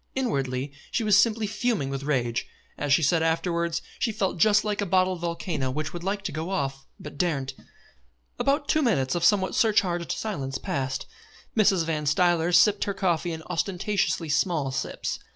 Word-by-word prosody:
Inwardly 135 - -1 0.2
she 235 - -1
was 210 -2 +5
simply 225 0 +1
fuming 205 - -1
with 135 0 -3
rage. 125 -5 -1 0.3
As 145 - -3
she 150 +3 +5
said 160 +3 +3
afterwards, 170 +1 0 0.2
she 230 - +1
felt 195 -4 -2
just 210 +2 +5
like 210 -1 -1
a - - 0
bottled 185 0 +2
volcano 170 -5 -2
which 150 +3 -3
would 175 -1 -6
like 200 +1 -2
to - - -3
go 160 +4 -4
off 135 -6 -3 0.2
and 150 - -8
daren't. 140 -7 0 0.9
About 285 +1 +1
two 310 - +2
minutes 135 - +1
of 175 - -1
somewhat 190 +1 +3
surcharged 180 -6 +2
silence 140 -12 -3
passed. 130 -1 -3 0.5
Mrs. 195 -6 +3
Van 155 -2 -2
Stuyler 175 +2 +2
sipped 200 +4 +4
her 200 - -2
coffee 175 -3 0
in 160 -1 -6
ostentatiously 180 -1 -1
small 145 -1 +1
sips. 130 - -3
170 Hz, 170 wpm, -26 LUFS, 145-200 Hz, 0.9 s, was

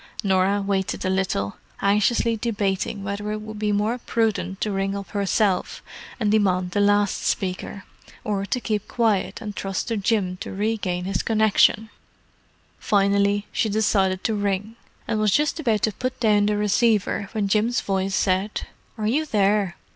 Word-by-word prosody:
Norah 195 +1 +2
waited 195 -1 -1
a 185 - +1
little, 185 - -1 0.2
anxiously 210 +3 +2
debating 205 -3 -2
whether 200 +2 -3
it 215 - -3
would 215 0 -8
be 210 -1 0
more 210 +4 0
prudent 210 -5 -1
to 215 - 0
ring 195 0 -1
up 200 -2 -7
herself 200 -1 0 0.4
and 210 -3 +1
demand 185 -4 +2
the 205 - 0
last 205 0 +2
speaker, 190 +1 -2 0.4
or 205 -2 -1
to 250 - -1
keep 215 -4 -2
quiet 225 -3 0
and 210 -3 -6
trust 195 +4 -3
to 230 - -1
Jim 195 -3 0
to - - -7
regain 195 -3 -2
his 190 -1 -1
connexion. 220 0 +3 0.9
Finally, 200 0 +2
she 220 - 0
decided 195 -3 +1
to 225 - 0
ring: 205 +1 -2 0.3
and 220 -2 0
was 215 0 +3
just 300 +8 +1
about 225 -9 0
to 215 - +3
put 255 +5 -4
down 210 -3 +3
the 210 0 +1
receiver 210 -1 +1
when 210 -2 0
Jim's 220 +4 +1
voice 195 0 -1
said, 190 +2 0 0.3
"Are 215 - -3
you 295 +8 +1
there?" 200 -5 +1
205 Hz, 160 wpm, -23 LUFS, 195-215 Hz, 0.9 s, connexion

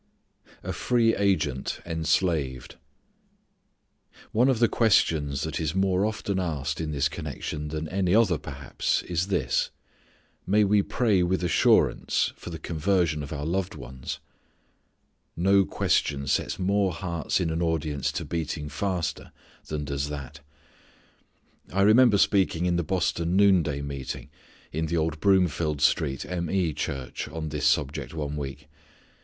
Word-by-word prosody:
A - - -3
Free 115 -2 +2
Agent 90 -10 0
Enslaved. 80 -5 0 1.6
One 125 +5 +3
of 130 - +2
the 115 +1 +4
questions 75 - +2
that 80 -2 -3
is 80 +1 -2
more 95 +1 +2
often 100 -3 -2
asked 75 -4 -2
in 80 - -3
this 70 -2 +1
connection 75 -1 -5
than 80 +1 -4
any 95 0 +1
other 105 -8 +3
perhaps - - -2
is 90 +1 -1
this: 100 - 0 0.8
may 105 +3 +4
we 105 0 +4
pray 105 -2 +1
with 90 +1 0
assurance 85 -2 +2
for - - -9
the 85 - -5
conversion 80 0 0
of 70 - -7
our 75 -1 -4
loved 95 +3 -1
ones? 65 0 -7 1.2
No 95 +3 +4
question 70 -5 0
sets - - 0
more 95 0 +1
hearts 85 -1 -2
in 85 -3 0
an 80 +1 -2
audience 80 -4 -1
to - - -3
beating 80 -2 -3
faster 90 +2 -3 0.4
than 75 -1 -3
does 70 0 -2
that. 70 -1 -7 1.3
I 100 +1 +2
remember 110 +1 +6
speaking 95 -4 +2
in 90 -1 +1
the 85 - +1
Boston 85 0 0
noonday 90 -8 +3
meeting, 70 -2 -6 0.4
in 80 +1 -2
the 85 +2 -1
old 80 -1 -1
Broomfield 85 -6 +2
Street 75 -2 +1
M. 85 -2 -3
E. 90 -4 +1
Church 70 -3 -4
on 80 -1 -5
this 75 -1 0
subject 75 +1 0
one 75 -2 -3
week. 70 -1 -6
80 Hz, 140 wpm, -26 LUFS, 75-95 Hz, 1.6 s, remember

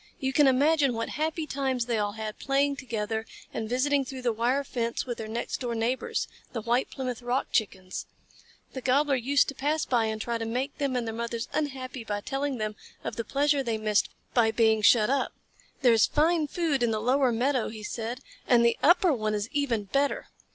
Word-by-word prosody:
You 265 -1 -1
can 290 0 +5
imagine 280 0 +3
what 230 0 -2
happy 315 +1 -2
times 265 -4 -1
they 235 -2 0
all 205 -1 -1
had, 215 -1 -6
playing 280 +1 +1
together 220 -3 -3 0.3
and 220 -1 -3
visiting 275 +3 +2
through 260 -1 -7
the 240 -2 +1
wire 245 +5 +1
fence 235 -3 -2
with 240 -2 -4
their 220 - -4
next 230 +2 -3
door 240 -3 -2
neighbors, 235 +3 -1 0.3
the 230 - -3
White 240 +3 +1
Plymouth 255 -2 -4
Rock 245 +2 -1
Chickens. 190 -4 -2 0.7
The 260 - -5
Gobbler 280 +3 +2
used 270 +3 +3
to - - -4
pass 300 +3 0
by 235 -3 +2
and 220 0 -2
try 235 +1 -2
to - - -2
make 255 +5 -3
them 275 -3 0
and 245 -2 0
their 225 - -3
mothers 235 0 -3
unhappy 265 -4 -3
by 205 -2 -3
telling 270 +2 -2
them 215 -1 -3 0.3
of - - -4
the 230 - -2
pleasure 285 +4 +2
they 230 -4 -1
missed 215 -1 +1 0.2
by 230 -2 +4
being 220 -1 +3
shut 215 +2 +5
up. 275 -1 0 0.5
"There 245 -2 +6
is 225 - +5
fine 315 +1 +2
food 305 -4 0
in 240 - +3
the 220 -1 0
lower 255 +3 +3
meadow," 250 +1 +1
he 215 -1 -8
said, 235 +3 -4 0.3
"and 235 -1 +5
the 235 - +2
upper 345 +1 +5
one 215 -4 -1
is 205 +2 -3
even 265 -7 0
better. 275 +8 0
245 Hz, 205 wpm, -28 LUFS, 225-275 Hz, 0.7 s, There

